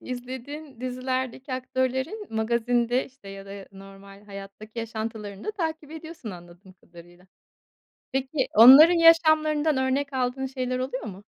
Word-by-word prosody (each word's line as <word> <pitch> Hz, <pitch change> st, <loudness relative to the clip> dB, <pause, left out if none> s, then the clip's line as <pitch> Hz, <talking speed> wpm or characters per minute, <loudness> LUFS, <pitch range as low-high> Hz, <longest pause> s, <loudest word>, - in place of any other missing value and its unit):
izlediğin 260 Hz, +2 st, -8 dB
dizilerdeki 255 Hz, +1 st, -4 dB
aktörlerin 260 Hz, -, -3 dB
magazinde, 235 Hz, +2 st, 0 dB
işte, 260 Hz, -7 st, -16 dB
ya 195 Hz, 0 st, -10 dB
da, 195 Hz, -, -9 dB
ya, 200 Hz, -1 st, -10 dB
normal 195 Hz, +1 st, -14 dB
hayattaki 200 Hz, +3 st, -11 dB
yaşantılarını 220 Hz, -3 st, -6 dB
da -, -, -2 dB
takip 320 Hz, -7 st, -4 dB
ediyorsun 320 Hz, -6 st, -9 dB
anladığım 175 Hz, +1 st, -14 dB
kadarıyla. 175 Hz, 0 st, -18 dB, 0.9 s
Peki, 265 Hz, +1 st, -1 dB
onların 270 Hz, +10 st, +9 dB
yaşamlarından 315 Hz, -2 st, +4 dB
örnek 265 Hz, +2 st, -1 dB
aldığın 260 Hz, 0 st, -2 dB
şeyler 255 Hz, -1 st, -3 dB
oluyor 255 Hz, 0 st, -4 dB
mu? 200 Hz, -1 st, -9 dB
255 Hz, 125 wpm, -25 LUFS, 210-275 Hz, 0.9 s, onların